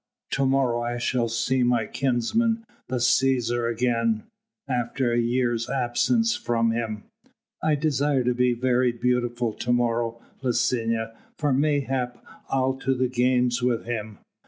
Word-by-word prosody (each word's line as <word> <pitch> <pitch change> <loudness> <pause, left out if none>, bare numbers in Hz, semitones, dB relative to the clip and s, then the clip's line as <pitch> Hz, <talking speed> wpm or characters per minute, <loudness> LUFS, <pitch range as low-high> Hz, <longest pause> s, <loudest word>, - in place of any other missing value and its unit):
To 135 - +1
morrow 130 -3 +2
I 120 0 -2
shall 120 -1 0
see 115 +3 0
my 120 -2 +2
kinsman 225 - 0 0.2
the 130 - -3
Cæsar 120 -1 +2
again, 115 -2 0 0.4
after 125 0 -1
a 120 - +2
year's 120 -1 0
absence 135 - +1
from 115 -1 0
him. 110 -2 -3 0.6
I 155 -1 +2
desire 145 -2 +1
to 125 +1 +1
be 125 0 +2
very 125 0 +2
beautiful 120 -1 0
to 120 - -3
morrow, 115 -1 0 0.2
Licinia, 115 -3 0 0.2
for 145 -3 +1
mayhap 135 -3 0 0.3
I'll 130 0 +1
to 135 0 0
the 130 0 0
games 125 0 +2
with 120 -2 0
him. 110 -3 -4
125 Hz, 135 wpm, -25 LUFS, 120-130 Hz, 0.6 s, morrow